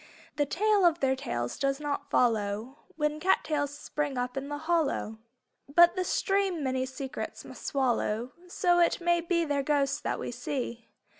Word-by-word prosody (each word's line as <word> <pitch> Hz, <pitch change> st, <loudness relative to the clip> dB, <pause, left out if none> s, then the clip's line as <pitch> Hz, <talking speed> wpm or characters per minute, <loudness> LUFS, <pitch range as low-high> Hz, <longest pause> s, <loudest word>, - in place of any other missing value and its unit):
The 290 Hz, -1 st, +2 dB
tale 415 Hz, +5 st, +2 dB
of 340 Hz, -1 st, +4 dB
their 265 Hz, -2 st, +2 dB
tails 120 Hz, -, -4 dB
does 275 Hz, 0 st, 0 dB
not 295 Hz, -1 st, -3 dB
follow 225 Hz, +3 st, 0 dB
When 300 Hz, -1 st, -1 dB
cat 380 Hz, +4 st, +3 dB
tails 290 Hz, -2 st, -2 dB
spring 295 Hz, -2 st, -3 dB
up 250 Hz, 0 st, -2 dB
in 270 Hz, +1 st, -4 dB
the 290 Hz, -, -3 dB
hollow. 310 Hz, -9 st, 0 dB, 0.5 s
But 345 Hz, +4 st, +6 dB
the 370 Hz, -, 0 dB
stream 390 Hz, -4 st, 0 dB
many 260 Hz, -1 st, 0 dB
secrets 260 Hz, 0 st, -6 dB
must -, -, -9 dB
swallow 245 Hz, -3 st, 0 dB, 0.2 s
So 350 Hz, 0 st, +2 dB
it 340 Hz, -, +3 dB
may 345 Hz, 0 st, +2 dB
be 335 Hz, 0 st, +1 dB
their 285 Hz, -2 st, 0 dB
ghosts 280 Hz, -1 st, +1 dB
that -, -, -2 dB
we -, -, -4 dB
see. 240 Hz, -4 st, -4 dB
290 Hz, 170 wpm, -29 LUFS, 260-340 Hz, 0.5 s, But